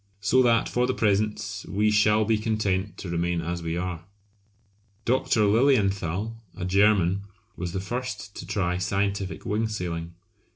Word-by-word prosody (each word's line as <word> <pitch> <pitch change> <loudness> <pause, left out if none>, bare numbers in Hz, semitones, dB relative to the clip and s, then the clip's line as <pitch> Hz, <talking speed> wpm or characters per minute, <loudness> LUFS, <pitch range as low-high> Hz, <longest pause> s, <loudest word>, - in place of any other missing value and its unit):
So 105 +6 +3
that 120 -2 +3
for 125 0 +1
the 130 - 0
present 105 -2 0
we 105 +2 +2
shall 105 0 +4
be 110 0 +2
content 105 -3 -1
to 95 - -6
remain 85 0 0
as 85 +1 -3
we 80 0 -3
are! 90 -2 -4 1.0
Dr. 120 -3 +2
Lilienthal, 105 - +2 0.2
a 90 - -3
German, 100 -1 +3 0.3
was 85 0 -4
the 95 - -2
first 105 -2 -5
to - - -7
try 90 -2 0
scientific 100 +1 -2
wing 110 +2 0
sailing. 85 -5 -4
100 Hz, 150 wpm, -26 LUFS, 90-110 Hz, 1.0 s, shall